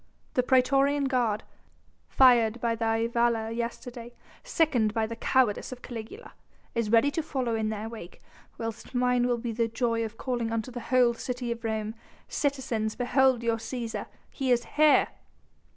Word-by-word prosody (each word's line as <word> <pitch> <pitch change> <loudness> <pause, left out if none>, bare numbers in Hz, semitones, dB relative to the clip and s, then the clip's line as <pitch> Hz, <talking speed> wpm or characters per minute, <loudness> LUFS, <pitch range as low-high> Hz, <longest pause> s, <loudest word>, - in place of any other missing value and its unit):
The 250 - +3
praetorian 275 +3 +3
guard, 245 -6 0 0.7
fired 240 -3 +5
by 235 0 0
thy 225 0 0
valour 235 -1 +1
yesterday, 235 +1 -5 0.3
sickened 285 - +1
by 225 -1 +1
the 230 +1 -6
cowardice 240 -1 +1
of 250 -1 -9
Caligula, 235 - -8 0.4
is 230 -2 -1
ready 235 +5 +5
to 325 - -1
follow 265 -6 -2
in 220 -1 0
their 215 0 -4
wake, 220 -6 -10 0.4
whilst 225 +2 -6
mine 250 0 +2
will 245 -1 +1
be 235 0 -4
the 230 +1 0
joy 230 0 0
of 225 0 -6
calling 240 -3 -2
unto 230 +2 -2
the 245 - -6
whole 250 -2 +4
city 245 0 -4
of 235 0 -5
Rome: 220 -1 -2 0.3
'Citizens, 250 -7 -1
behold 255 -1 +2
your 230 -1 +1
Cæsar! 230 0 -5 0.2
He 270 -2 -3
is 240 -1 +2
here!'" 305 0 +4
235 Hz, 160 wpm, -28 LUFS, 225-255 Hz, 0.7 s, fired